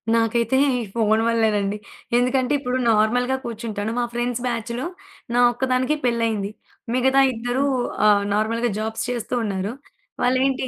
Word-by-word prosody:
నాకైతే 230 +2 +2 0.2
ఈ - - -1
ఫోను 220 -1 +2
వల్లేనండి. 210 -3 +1 0.4
ఎందుకంటే 255 +2 +1
ఇప్పుడు 250 -1 -2
నార్మల్‌గా 245 +4 +2
కూర్చుంటాను. 220 -2 -4
మా 240 - +1
ఫ్రెండ్స్ 240 0 -2
బ్యాచ్‌లో 235 +3 -3 0.5
నా 245 - +4
ఒక్కదానికే 255 +3 0
పెళ్ళయింది. 230 -4 0 0.5
మిగతా 265 +2 +3
ఇద్దరు 245 +4 -1 0.4
ఆహ్, 205 -1 +5
నార్మల్‌గా 230 +3 0
జాబ్స్ 220 +1 -3
చేస్తూ 245 0 -3
ఉన్నారు. 200 0 -2 0.5
వాళ్ళేంటి? 260 +1 +1
235 Hz, 125 wpm, -22 LUFS, 220-250 Hz, 0.5 s, ఆహ్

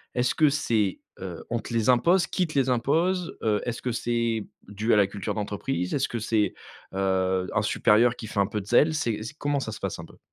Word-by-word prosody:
est-ce 125 0 +1
que 155 -2 +5
c'est 115 -9 0 0.2
heu, 90 -3 -7
on 120 - -1
te 115 - -8
les 115 0 +1
impose? 170 +8 +4
Qui 180 +2 0
te 155 - -5
les 130 -1 +1
impose? 165 +9 +1
Heu 105 -2 +1
est-ce 120 0 -3
que 125 - -2
c'est 115 -2 -1 0.2
dû 105 +3 0
à - - +6
la 100 -2 +4
culture 100 0 -4
d'entreprise? 105 -1 -3
Est-ce 135 -2 +1
que 120 - -4
c'est, 105 -1 +1 0.4
heu, 95 -1 0
un - - +2
supérieur 115 +3 +3
qui 110 - -8
fait 105 - -3
un 100 - +3
peu 105 0 -3
de - - -12
zèle? 145 +8 +4
C'est 115 -9 -1
c 115 - -7
comment 145 -1 0
ça 120 -4 -4
se - - -8
passe - - -4
un - - -7
peu? - - -18
115 Hz, 240 wpm, -26 LUFS, 105-135 Hz, 0.4 s, à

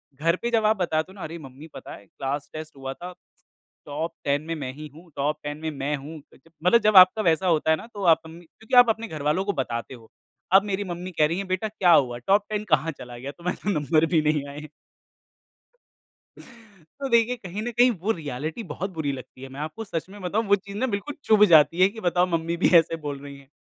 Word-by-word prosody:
घर 165 +5 +1
पे 235 0 -2
जब 220 -2 +2
आप 215 0 +3
बता 160 -4 +1
दो 185 +4 -13
ना 200 - -12
अरे 165 +2 -6
मम्मी 140 +2 -12
पता - - -9
है, 100 - -16
क्लास 140 +6 -5
टेस्ट 155 -1 -8
हुआ 135 0 -5
था। 180 +4 -9 0.7
टॉप 155 +3 -4
10 140 0 +2
में 165 - -2
मैं 135 -4 -5
ही 150 +2 -9
हूँ! 170 +1 -15
टॉप 145 +2 -1
10 145 0 -4
में 160 - -2
मैं 145 +1 -2
हूँ। 150 +3 -9 0.5
मतलब 230 +6 +5
जब 210 -2 +4
आपका 185 +4 +8
वैसा 170 +2 +2
होता 160 -1 +2
है 160 - +3
ना 225 - -10
तो 200 -1 -6
आप 165 -1 +6
मम्मी 170 +2 -13
क्योंकि 220 +9 -5
आप 245 -2 +8
अपने 225 +1 -1
घरवालों 155 +4 -1
को 200 - 0
बताते 115 +2 -5
हो। 115 -2 -17 0.4
अब 195 +1 +7
मेरी 200 0 -2
मम्मी 180 +1 -6
कह 150 - +6
रही 170 +3 -2
हैं 200 - -5
बेटा 185 +4 -1
क्या 185 -4 +2
हुआ? 120 -3 +3
टॉप 200 - +2
10 210 0 -2
कहाँ 155 +2 +2
चला 120 -1 -9
गया? 135 +3 -6
तुम्हारे 175 +3 -4
तो 190 -6 0
नंबर 155 +2 +2
भी 155 - +5
नहीं 150 -2 +1
आए 145 +1 -8
हैं। 155 -1 -10 2.3
तो 275 - -1
देखिए, 235 +1 +3
कहीं 200 -2 -7
न 240 +2 -3
कहीं 245 +2 +4
वो 200 +2 -2
रीऐलिटी 155 - -5
बहुत 180 +4 -5
बुरी 150 -3 -2
लगती 130 -1 -10
है। 135 - -7
मैं 135 +2 -10
आपको 155 +9 -5
सच 165 -6 -4
में 205 0 -12
बताऊँ 205 +5 -1
वो 200 - +6
चीज़ 200 +1 -9
ना 260 - 0
बिल्कुल 230 +7 -4
चुभ 215 -1 +5
जाती 165 +1 +5
है 190 - +8
कि 220 +2 -10
बताओ 180 -1 +2
मम्मी 165 +1 -2
भी - - +3
ऐसे 165 0 +2
बोल 145 -3 -5
रहीं 140 -1 -9
हैं 135 -1 -18
165 Hz, 240 wpm, -25 LUFS, 150-200 Hz, 2.3 s, आपका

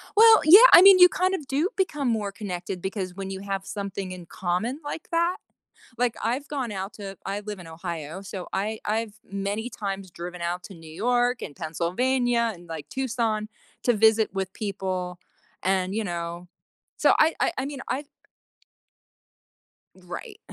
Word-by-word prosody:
Well, 445 +1 +8
yeah. 335 +6 +10
I - - +12
mean 385 0 +9
you 360 0 +10
kind 370 +1 0
of 310 -8 -4
do 295 +8 +1
become 295 -8 0
more 215 -4 0
connected 185 -3 -5
because 190 -1 -4
when 195 0 -5
you 190 0 -5
have 195 -1 -4
something 200 -2 -5
in 180 -1 -8
common 185 - -2
like 290 +2 -6
that? 340 +2 +1 0.6
Like 245 -1 +1
I've 255 +5 -1
gone 260 -6 -3
out 195 +1 -4
to 195 -2 -8
I 200 +1 -3
live 210 -1 -6
in 175 - -11
Ohio. 165 0 -6
So 190 -2 -7
I 215 +3 -2
I've 220 0 -1 0.2
many 200 +4 -3
times 195 -4 -5
driven 175 +1 -8
out 175 +1 -2
to 195 - -10
New 165 -2 -13
York 245 +7 +1
and 145 - -6
Pennsylvania 235 +9 0
and 175 -1 -15
like 155 -3 -7
Tucson 230 - -1 0.4
to 245 - +4
visit 220 0 +4
with 190 -1 -3
people. 185 -3 -4 0.4
And, 190 0 0
you 220 0 -1
know, 170 -1 -5 0.5
so - - +5
I 320 +1 +4
I - - +2
I 265 - -1
mean, 280 -1 -6
I 270 +4 -2 1.9
Right. 290 - -9
200 Hz, 170 wpm, -25 LUFS, 185-250 Hz, 1.9 s, I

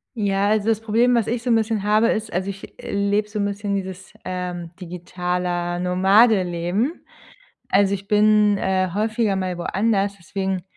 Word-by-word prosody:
Ja, 200 -2 +1
also 215 0 +1
das 225 -1 +1
Problem, 235 +3 +2
was 230 -3 +1
ich 235 0 -1
so 245 - -3
'n 230 - +5
bisschen 220 -2 0
habe, 215 +3 +3
ist 220 -2 -2
also 185 +3 -1
ich 195 0 -9
lebe 200 +1 0
so 210 - -4
'n 200 - +1
bisschen 200 0 -2
dieses, 190 -1 -6
ähm, 180 -2 -5
digitale 180 0 -3
Nomadenleben. 190 - +2 0.7
Also, 200 0 +3
ich 195 0 -7
bin, 210 -1 +4
äh, 185 -1 0
häufiger 220 0 0
mal 185 -2 -2
woanders, 200 +2 0
deswegen 190 +2 -3
200 Hz, 160 wpm, -22 LUFS, 185-215 Hz, 0.7 s, n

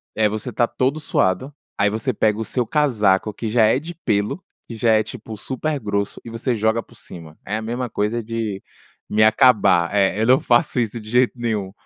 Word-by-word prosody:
é 110 -1 +3
você 110 0 -4
estar 120 - +1
todo 130 +6 -1
suado, 130 0 0 0.2
aí 105 - +3
você 110 +5 -2
pega 105 -1 +1
o 115 - -1
seu 125 0 -1
casaco 110 -9 +2
que 115 - -5
já 110 +1 +3
é 115 +4 +3
de 170 +4 -9
pêlo, 110 - -1 0.2
que 115 - -7
já 115 +1 +2
é, 110 0 +3
tipo, 110 -2 -9
super 145 +6 -3
grosso, 100 -3 -2
e - - -7
você 115 +2 -2
joga 110 +2 +1
por 120 - -20
cima. 80 -7 -9
É 105 - -3
a - - -4
mesma 120 +2 -3
coisa 110 +3 -1
de 110 -3 -4 0.5
me 110 +1 +3
acabar, 110 -6 +4
eh, 100 +1 +2
eu - - +2
não 130 +3 +5
faço 150 -6 +2
isso 115 0 -2
de 110 0 -11
jeito 125 0 +3
nenhum. 110 -5 -2
110 Hz, 215 wpm, -21 LUFS, 105-125 Hz, 0.5 s, não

